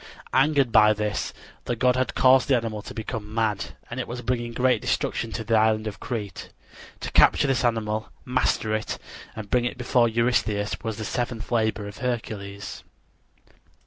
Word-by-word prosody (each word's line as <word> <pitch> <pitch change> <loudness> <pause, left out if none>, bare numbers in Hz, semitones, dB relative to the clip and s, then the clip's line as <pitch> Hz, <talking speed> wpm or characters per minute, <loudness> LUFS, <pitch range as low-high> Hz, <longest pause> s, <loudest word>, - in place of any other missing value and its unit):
Angered 135 -2 +3
by 105 -1 +6
this, 105 0 -2 0.3
the 120 - -1
god 125 +1 +3
had 130 -1 -1
caused 130 0 +5
the 135 - +4
animal 110 -2 -3
to - - -9
become 110 -1 -5
mad, 110 -3 -1
and 120 - -6
it 130 - -3
was 125 +1 -6
bringing 120 -1 -1
great 125 +2 +2
destruction 115 - -1
to 115 - -3
the 115 +1 -2
island 110 0 +3
of 105 -2 -5
Crete. 105 -6 -5 0.5
To - - -4
capture - - +5
this 135 -1 +1
animal, 110 -2 0 0.2
master 125 -3 +1
it, 110 0 -2 0.4
and 110 -2 -8
bring 125 -1 +3
it 120 - -3
before 125 -1 +3
Eurystheus, 110 -3 +1
was 110 -2 -4
the 110 - -4
seventh 120 -1 -3
labor 110 -3 +1
of 100 - -9
Hercules. 105 -5 -4
115 Hz, 175 wpm, -25 LUFS, 110-125 Hz, 0.5 s, by